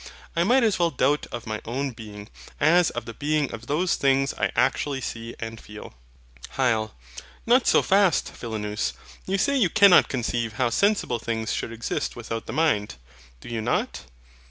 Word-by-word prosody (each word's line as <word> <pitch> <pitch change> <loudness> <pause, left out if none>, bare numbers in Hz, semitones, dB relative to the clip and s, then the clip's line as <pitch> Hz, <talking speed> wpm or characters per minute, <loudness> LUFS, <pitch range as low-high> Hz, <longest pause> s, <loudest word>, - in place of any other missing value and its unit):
I 170 - +3
might 245 +7 +4
as 215 -5 +2
well 170 -1 +3
doubt 145 0 +1
of 120 -1 -6
my 110 -1 -4
own 135 +4 -3
being, 105 -3 -10 0.3
as 170 +3 +4
of 120 -1 -6
the 115 - -7
being 150 +2 -1
of 115 +1 -8
those 170 +5 +1
things 135 0 +2
I - - -1
actually 140 -2 +1
see 115 -2 -6
and 115 0 -6
feel. 105 0 -11 0.6
HYL. 110 -5 +1 0.5
Not 245 +2 +4
so - - +5
fast, 195 -4 +3
Philonous: 105 -2 -3 0.3
you 195 +1 0
say 280 +8 +1
you 225 -10 +3
cannot 200 -1 +6
conceive 120 -3 -2
how 120 +2 0
sensible 200 - +1
things 110 -1 -3
should - - -3
exist 115 0 -3
without 115 -1 -6
the - - -4
mind. 125 - +1 0.5
Do - - -12
you 115 -2 -3
not? 120 +3 -1
125 Hz, 175 wpm, -25 LUFS, 115-170 Hz, 0.6 s, cannot